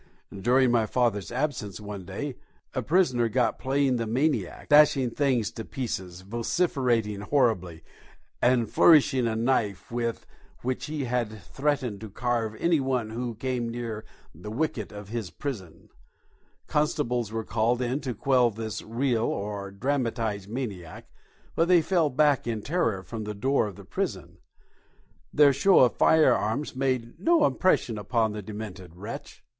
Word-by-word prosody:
During 125 +5 +3
my 115 -2 +2
father's 115 -5 0
absence 125 -8 -2
one 105 -3 -7
day 125 +9 -5 0.4
a 130 - -1
prisoner 130 -6 +2
got 125 +2 +1
playing 135 -1 +1
the 115 -1 -2
maniac, 140 +7 -1
dashing 145 -4 +5
things 125 -6 +1
to 115 - -7
pieces, 95 -8 -5
vociferating 115 - 0
horribly, 105 - 0 0.6
and 120 -2 +3
flourishing 135 -5 +5
a 110 - -1
knife 110 -5 0
with 115 -1 -2 0.4
which 130 +1 -2
he 150 -2 -3
had 120 -5 -2
threatened 135 -3 -2
to 110 - -7
carve 115 0 -1
any 170 +5 +2
one 130 -5 -1
who 120 0 -4
came 125 0 -2
near 115 -2 -5 0.3
the 90 +7 -9
wicket 120 -3 -2
of 105 -1 -9
his 115 -4 -4
prison, 100 - -7 0.8
Constables 125 -7 0
were 115 0 -3
called 115 +2 +1
in 125 +2 -1
to 130 -4 -4
quell 125 +1 +3
this 110 0 -5
real 115 0 0
or 100 -1 -3
dramatised 115 -3 -2
maniac, 105 -9 -6 0.4
but 165 - +2
they 175 -2 +5
fell 165 -2 +2
back 145 -1 +2
in 110 -3 -2
terror 115 - 0
from 110 +1 -6
the 105 0 -5
door 130 +2 +1
of 100 - -8
the - - -12
prison. - - -4 0.9
Their 145 -2 +6
show 190 +8 +5
of 125 - +5
firearms 145 -4 +3
made 130 -3 -1
no 330 -2 +4
impression 120 - +1
upon 110 +1 0
the 105 0 -5
demented 100 -4 -8
wretch. 105 +6 -8
120 Hz, 150 wpm, -27 LUFS, 105-135 Hz, 0.9 s, Their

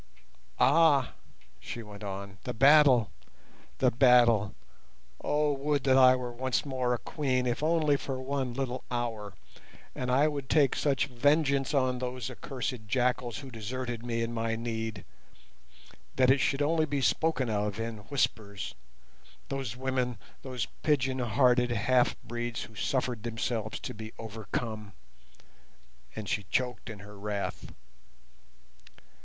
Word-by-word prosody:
"Ah!" 150 -6 +4 0.5
she 120 - -7
went 105 -1 -11
on, 100 0 -6
"the - - -4
battle! 135 -3 +6 0.7
the - - +3
battle! 120 -5 +5 0.7
Oh, 150 0 +2
would 140 0 -1
that 130 -1 +4
I 130 -1 +7
were 125 -1 -4
once 130 +4 -1
more 130 -3 0
a - - -3
Queen, 130 +2 -1
if 120 +1 -1
only 155 -2 +3
for 135 -1 -4
one 130 -2 -2
little 130 -1 -3
hour, 115 -5 -3 0.6
and 125 - -3
I 135 +4 +4
would 140 -3 -4
take 145 -4 +4
such 140 -3 +1
a 135 - -16
vengeance 140 +2 +2
on 130 -2 +1
those 125 -2 -4
accursed 125 -4 -5
jackals 125 0 0
who 135 -2 -9
deserted 120 +1 -5
me 115 -1 -1
in 115 +1 -3
my 115 0 -1
need; 115 -3 -4 1.1
that 130 0 +5
it 135 - +4
should 140 +2 +1
only 155 +1 +2
be 140 -2 -1
spoken 135 -1 +1
of 105 -1 -1
in 115 0 -3
whispers; 100 - -1 0.8
those 135 -4 -4
women, 130 -2 -1 0.2
those 130 -3 -3 0.2
pigeon 135 -4 +1
hearted 125 +1 +3
half 120 +2 +2
breeds 120 0 -4
who 115 - -12
suffered 125 +1 -1
themselves 115 -1 -3
to - - -5
be 110 0 -9
overcome!" 110 -1 -5 1.2
and 110 -2 -6
she 115 -2 0
choked 125 -4 -1
in 105 -2 -8
her 105 0 -12
wrath. 100 -1 -4
125 Hz, 140 wpm, -29 LUFS, 115-135 Hz, 1.2 s, I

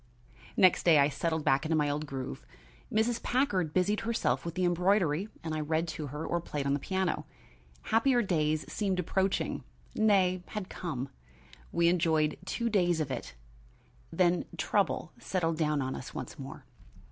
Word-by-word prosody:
Next 185 -2 +6
day 165 -3 +6
I 140 0 +5
settled 160 +2 -1
back 135 +1 +3
into 160 0 0
my 150 -1 +2
old 150 +1 -2
groove. 135 -2 -5 0.5
Mrs. 225 +2 +1
Packard 205 - +1
busied 185 +5 +2
herself 230 0 0
with 170 +1 -6
her 185 - +1
embroidery 180 0 +2
and 160 -1 -3
I 155 - -1
read 160 +2 0
to 155 -1 -4
her 150 +4 -5
or 170 - -1
played 145 -4 -4
on 140 - +2
the 145 - 0
piano. 190 +2 -1 0.6
Happier 240 +2 +3
days 155 -5 +1
seemed 195 -3 -1
approaching, 190 +2 0 0.3
nay, 190 -4 +3
had 210 -3 -5
come. 140 -7 -4 0.6
We 170 0 +3
enjoyed 160 -3 +2
two 235 - -2
days 175 -6 +2
of 150 -4 -2
it, 120 - -5 0.8
then 175 +1 +2
trouble - - 0
settled 165 -4 -1
down 150 -3 +1
on 130 0 -2
us 130 - -8
once - - -6
more. 135 -1 -8
170 Hz, 165 wpm, -30 LUFS, 150-190 Hz, 0.8 s, Next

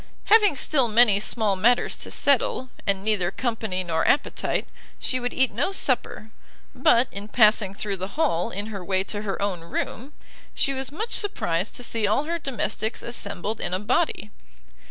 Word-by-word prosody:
Having 420 -8 +6
still 270 -2 +2
many 220 -2 +5
small 215 -1 0
matters 235 +6 +2
to - - -4
settle, 470 - +1 0.2
and 195 0 0
neither 205 -5 +2
company 220 -4 -2
nor 160 -2 -1
appetite, 290 - 0 0.3
she 255 - 0
would 245 0 -3
eat 260 -2 +1
no 275 - 0
supper; 250 - 0 0.4
but, 255 -6 +3
in 200 +1 -7
passing 215 -3 +3
thro' 205 -1 -3
the 190 0 -5
hall, 175 - +1
in 205 +3 -5
her 195 -2 -6
way 190 +1 0
to 205 +1 -4
her 200 -2 -4
own 200 -3 -1
room, 230 - -5 0.4
she 275 - +1
was 265 0 -4
much 435 +10 -4
surprised 190 - -1
to 245 - -3
see 225 -3 0
all 215 +8 +1
her 335 +2 -3
domestics 250 -5 -3
assembled 205 -2 -4
in 180 - -1
a - - -2
body. 210 - -1
220 Hz, 175 wpm, -24 LUFS, 195-260 Hz, 0.4 s, Having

